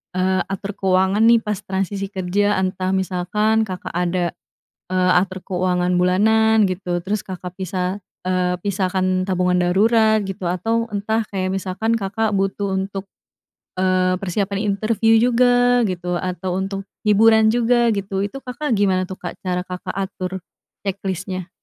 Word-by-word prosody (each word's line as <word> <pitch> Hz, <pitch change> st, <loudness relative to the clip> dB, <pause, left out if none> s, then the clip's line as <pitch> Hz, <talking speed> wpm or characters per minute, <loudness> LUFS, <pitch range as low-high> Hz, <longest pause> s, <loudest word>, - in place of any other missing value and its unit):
eee, 185 Hz, 0 st, +1 dB
atur 195 Hz, +1 st, -4 dB
keuangan, 190 Hz, +3 st, +2 dB
nih, 230 Hz, -1 st, +6 dB
pas 210 Hz, -2 st, -2 dB
transisi 195 Hz, +1 st, -2 dB
kerja, 200 Hz, +2 st, +1 dB
entah 185 Hz, 0 st, -1 dB
misalkan 210 Hz, +4 st, 0 dB
Kakak 185 Hz, -1 st, -6 dB
ada, 175 Hz, 0 st, 0 dB, 0.6 s
eee, 185 Hz, 0 st, +2 dB
atur 185 Hz, 0 st, -4 dB
keuangan 180 Hz, -1 st, 0 dB
bulanan, 220 Hz, +4 st, +4 dB
gitu, 175 Hz, -2 st, -3 dB
terus 205 Hz, +2 st, -1 dB
Kakak 180 Hz, -1 st, -7 dB
pisah, 185 Hz, +1 st, -2 dB, 0.3 s
eee, 180 Hz, -1 st, +1 dB
pisahkan 185 Hz, -2 st, 0 dB
tabungan 180 Hz, -1 st, +1 dB
darurat, 220 Hz, +4 st, +3 dB
gitu, 190 Hz, -1 st, -5 dB
atau 225 Hz, +6 st, 0 dB
entah 220 Hz, +2 st, -1 dB
kayak 185 Hz, -2 st, -2 dB
misalkan 195 Hz, +4 st, -1 dB
Kakak 220 Hz, +2 st, -1 dB
butuh 195 Hz, 0 st, -1 dB
untuk, 195 Hz, 0 st, -4 dB, 0.7 s
eee, 185 Hz, 0 st, +2 dB
persiapan 195 Hz, +1 st, -1 dB, 0.2 s
interview 225 Hz, +1 st, +3 dB
juga, 245 Hz, +1 st, +4 dB
gitu, 180 Hz, -1 st, -3 dB
atau 185 Hz, 0 st, -3 dB
untuk 195 Hz, 0 st, -4 dB, 0.2 s
hiburan 220 Hz, +1 st, +5 dB
juga, 240 Hz, +1 st, +3 dB
gitu, 195 Hz, -2 st, -2 dB
itu 205 Hz, +7 st, -3 dB
Kakak 275 Hz, +3 st, -5 dB
gimana, 185 Hz, -2 st, +1 dB
tuh, 190 Hz, -, -6 dB
Kak, -, -, -6 dB
cara 180 Hz, -1 st, -2 dB
Kakak 180 Hz, -1 st, -6 dB
atur 190 Hz, -1 st, -3 dB, 0.5 s
ceklisnya? 190 Hz, -1 st, -4 dB
190 Hz, 140 wpm, -21 LUFS, 185-215 Hz, 0.7 s, nih